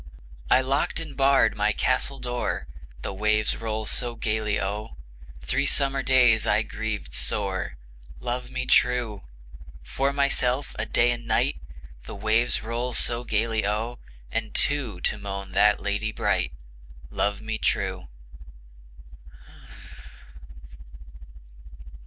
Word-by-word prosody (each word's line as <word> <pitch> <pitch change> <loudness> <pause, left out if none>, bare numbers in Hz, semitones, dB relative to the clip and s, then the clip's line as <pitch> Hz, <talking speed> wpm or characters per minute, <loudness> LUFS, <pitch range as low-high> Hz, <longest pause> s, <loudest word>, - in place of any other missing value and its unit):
I 130 - +6
locked 135 +4 0
and 160 -2 -6
barred 135 0 +4
my 105 0 +2
castle 130 +4 0
door, 120 - -3 0.4
The - - -3
waves 105 +1 +2
roll 110 -1 -3
so 120 +3 0
gayly 105 -2 -1
O, 105 +1 -4 0.5
Three 140 - 0
summer 135 -1 +2
days 125 -5 +4
I 105 +2 +3
grieved 110 -1 -5
sore, - - -1 0.4
Love 125 0 -3
me 130 0 -3
true! 120 -6 +2 0.6
For 135 - 0
myself 140 -1 +1
a 110 - -2
day, 120 +1 +3
a 120 - -2
night, 110 -11 0 0.4
The - - -7
waves 110 +4 +1
roll 120 +2 -3
so 120 +1 +1
gayly 110 -1 0
O, 110 +4 -2 0.3
And - - -3
two 125 -11 0
to 105 - 0
moan 100 -1 -6
that 105 +2 +4
lady 100 +2 -2
bright, 65 - 0 0.6
Love 100 +8 0
me 110 0 -4
true! 95 -4 0
115 Hz, 120 wpm, -26 LUFS, 105-125 Hz, 0.6 s, I